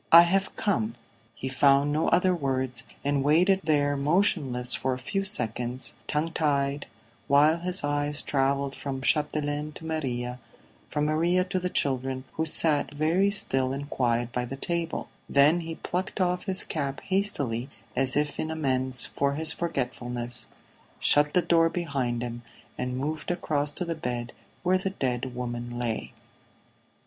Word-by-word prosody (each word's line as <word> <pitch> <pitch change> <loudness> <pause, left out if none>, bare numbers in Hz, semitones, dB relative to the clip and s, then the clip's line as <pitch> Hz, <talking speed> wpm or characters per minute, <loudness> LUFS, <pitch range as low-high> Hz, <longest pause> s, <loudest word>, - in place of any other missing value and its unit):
"I 170 +1 +11
have 195 +3 0
come." 115 - 0 0.4
He 130 - -5
found 140 +2 +4
no 155 +2 +1
other 185 +1 +3
words, 130 -5 -2 0.2
and 140 -1 +1
waited 180 +7 +4
there 145 -2 +2
motionless 140 -5 +2
for 130 0 0
a - - -7
few 195 +9 -2
seconds, 125 - 0
tongue 155 +2 -1
tied, 145 -2 0 0.4
while 150 +4 +5
his 180 +1 +1
eyes 145 0 -1
travelled 140 0 0
from 135 -2 -5
Chapdelaine 150 0 0
to 160 - -10
Maria, 125 -6 -3 0.5
from 150 0 0
Maria 170 +4 +2
to 185 0 -2
the 180 0 -2
children 130 -4 -1
who 160 - -1
sat 150 -3 +3
very 165 +7 +2
still 135 -10 +3
and 145 +2 -6
quiet 120 -1 0
by 125 - -1
the 125 +2 -5
table; 170 +2 -2 0.2
then 145 +5 +5
he 165 -1 -5
plucked 185 +5 -4
off 180 -1 0
his 190 -2 +1
cap 140 -3 -3
hastily, 145 - -1 0.3
as 130 +1 +2
if 150 0 -1
in 160 - -2
amends 130 -5 +1
for 140 0 -1
his 160 +2 +1
forgetfulness, 125 -7 -3 0.5
shut 150 +2 +3
the 180 - +4
door 165 -1 +4
behind 135 -9 -2
him 120 0 -5 0.3
and 125 0 -3
moved 150 +4 -2
across 150 -4 0
to 180 +5 -4
the 170 - -2
bed 120 -6 -4 0.3
where 185 +1 +3
the 195 - -1
dead 130 -7 -3
woman 120 -1 -4
lay. 120 -2 -3
145 Hz, 155 wpm, -27 LUFS, 130-165 Hz, 0.5 s, I